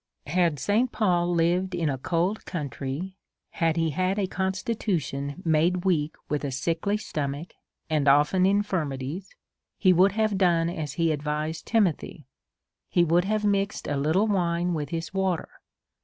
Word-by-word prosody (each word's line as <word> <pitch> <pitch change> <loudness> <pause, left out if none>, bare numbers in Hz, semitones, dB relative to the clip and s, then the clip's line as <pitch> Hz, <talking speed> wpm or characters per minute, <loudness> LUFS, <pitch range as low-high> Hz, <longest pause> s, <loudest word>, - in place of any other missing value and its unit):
Had 170 -4 +1
St. 215 - +1
Paul 175 -5 +1
lived 180 +3 +1
in 170 -2 0
a 135 -3 -1
cold 175 +9 -1
country, 150 +3 -5 0.3
had 165 -2 0
he 165 -1 +1
had 185 +6 0
a 200 - +1
constitution 185 - -2
made 170 +3 +2
weak 160 -5 +1
with 150 0 -2
a 140 - -1
sickly 165 +9 -1
stomach, 150 -5 -4 0.3
and 150 -3 0
often 150 +7 +4
infirmities, 180 -4 -2 0.4
he 185 -2 +5
would 185 +3 +4
have 215 -2 +1
done 170 -3 +3
as 155 -5 -4
he 165 +1 +1
advised 150 +2 -3
Timothy; 205 -9 0 0.6
he 175 - +3
would 170 +2 +3
have 215 +1 0
mixed 200 0 0
a 145 - -1
little 155 +9 +2
wine 175 -4 0
with 150 -3 -3
his 165 +2 -4
water. 190 -3 -1
170 Hz, 150 wpm, -26 LUFS, 150-190 Hz, 0.6 s, he